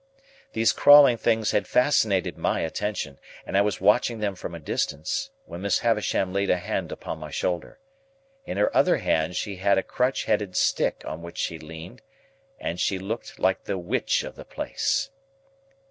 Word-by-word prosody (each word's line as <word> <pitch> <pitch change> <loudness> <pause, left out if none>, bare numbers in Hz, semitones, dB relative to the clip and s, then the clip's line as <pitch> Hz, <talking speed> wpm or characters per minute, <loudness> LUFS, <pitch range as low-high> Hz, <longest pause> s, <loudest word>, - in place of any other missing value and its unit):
These 110 -1 +3
crawling 145 -3 +8
things 110 -1 +1
had 100 -3 0
fascinated 110 -8 +2
my - - 0
attention, 80 -5 -3 0.3
and - - -5
I 100 - +5
was 105 0 0
watching 110 +4 +3
them 105 -2 -1
from 90 -2 -7
a - - -7
distance, 80 - -2 0.2
when 85 - -8
Miss 100 0 +2
Havisham 105 -5 0
laid 100 0 0
a - - +3
hand 90 - -3
upon 80 - -6
my 75 -1 -7
shoulder. 85 +4 -3 0.7
In - - -5
her 105 - +1
other - - +4
hand 80 +2 0
she 100 +1 -3
had 100 +1 +2
a 95 - +1
crutch 125 +2 -1
headed 105 -3 0
stick - - +1
on 80 +2 -6
which 85 0 -10
she 80 - -2
leaned, 80 +9 -10 0.6
and 85 - -4
she 95 - +1
looked 105 +5 -6
like 95 0 +1
the 95 - -2
Witch 90 -1 0
of - - -8
the - - -10
place. 275 - -2
100 Hz, 175 wpm, -25 LUFS, 85-110 Hz, 0.7 s, crawling